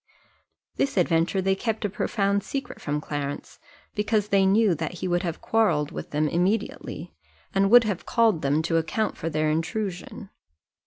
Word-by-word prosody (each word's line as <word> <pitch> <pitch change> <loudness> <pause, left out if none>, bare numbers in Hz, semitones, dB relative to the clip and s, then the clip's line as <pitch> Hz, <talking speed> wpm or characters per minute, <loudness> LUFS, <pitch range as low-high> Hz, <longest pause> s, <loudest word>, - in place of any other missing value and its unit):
This 275 - 0
adventure 175 +2 +2
they 195 +1 +3
kept 220 +2 -2
a - - +3
profound 200 0 0
secret 275 +6 -6
from 150 0 -2
Clarence, 145 -1 -5 0.3
because 210 0 0
they 195 -1 +4
knew 205 0 +4
that 160 +2 -3
he 180 - -4
would 175 0 +1
have 170 -3 -4
quarrelled 210 -10 +1
with - - -7
them 150 +1 0
immediately, 190 +7 -2 0.4
and 195 0 +3
would 240 +2 +8
have 205 -5 -3
called 225 -8 +3
them 145 +3 +1
to 165 0 +1
account 165 +7 -1
for 165 - -4
their 155 -1 0
intrusion. 190 +4 -4
190 Hz, 165 wpm, -25 LUFS, 160-210 Hz, 0.4 s, would